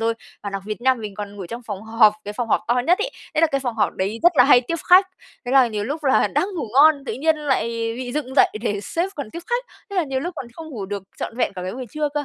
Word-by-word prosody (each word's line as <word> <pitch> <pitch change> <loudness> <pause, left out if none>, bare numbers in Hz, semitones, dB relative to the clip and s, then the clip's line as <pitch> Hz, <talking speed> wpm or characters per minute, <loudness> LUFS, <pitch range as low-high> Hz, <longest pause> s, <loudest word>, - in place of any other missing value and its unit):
rồi. 230 0 +1 0.3
Và 200 - -4
đặc 195 -1 -4
biệt 215 +2 -4
nha, 260 +1 +4
mình 215 -5 -7
còn 205 0 -7
ngủ 190 -3 -6
trong 235 +6 -7
phòng 205 -3 -6
họp, 220 -1 +4
cái 205 - -5
phòng 230 +1 -3
họp - - +3
to 240 - +3
nhất 355 +3 +4
ấy, 470 +4 -1 0.2
thế 310 - +2
là 330 - +6
cái 275 -2 -1
phòng 245 -3 -3
họp - - +1
đấy 200 +4 -2
rất 350 +1 +6
là 250 - +7
hay 255 -2 +7
tiếp 335 - 0
khách, 375 +1 +8 0.4
thế 245 - -3
là 265 -2 +6
nhiều 210 -2 -3
lúc 295 +5 -4
là 265 - +3
đang 370 - 0
ngủ 310 - -3
ngon, 285 0 +6
tự - - -2
nhiên 315 +4 +1
lại 285 -6 0 0.3
bị 250 -1 -5
dựng 270 -3 -3
dậy - - +6
để 205 -3 -1
sếp 340 - -2
còn 280 -7 -5
tiếp - - -7
khách, - - -1 0.3
thế 400 - -5
là 350 - +2
nhiều 265 -2 -2
lúc 350 +4 -4
còn 255 - -5
không 320 +2 -9
ngủ 205 -7 -5
được 200 -1 -4
trọn 230 - -5
vẹn 235 - 0
cả 180 - -6
cái 185 - -4
buổi 255 0 -6
trưa 305 -1 -1
cơ. 295 -1 -1
255 Hz, 305 wpm, -22 LUFS, 215-305 Hz, 0.4 s, khách